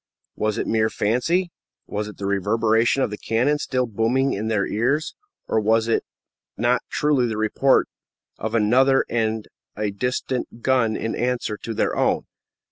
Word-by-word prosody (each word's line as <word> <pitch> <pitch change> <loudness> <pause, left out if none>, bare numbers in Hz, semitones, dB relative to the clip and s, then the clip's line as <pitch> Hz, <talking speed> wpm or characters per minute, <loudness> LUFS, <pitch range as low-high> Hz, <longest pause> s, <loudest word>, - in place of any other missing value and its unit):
Was 110 -1 -1
it - - -1
mere 110 -1 +1
fancy? 165 - 0 0.3
Was 105 0 -3
it 105 - -10
the 100 - -5
reverberation 110 +6 +2
of - - -1
the 105 - -6
cannon 130 +7 +1
still 130 -3 0
booming 120 +5 +1
in 105 +3 -3
their 105 -3 +1
ears? 135 +8 0 0.3
Or 110 - +1
was 110 +1 +2
it 115 - +1 0.5
not 120 +3 +2
truly 145 -5 +2
the 110 -2 -3
report 110 +5 +3 0.5
of 110 +1 -3
another 130 +5 +4
and 110 -2 -1 0.3
a 105 0 -2
distant 125 +2 -3
gun 125 -4 +2
in 115 - -3
answer 120 -3 -1
to 115 +1 -6
their - - 0
own? - - +1
115 Hz, 160 wpm, -23 LUFS, 110-125 Hz, 0.5 s, another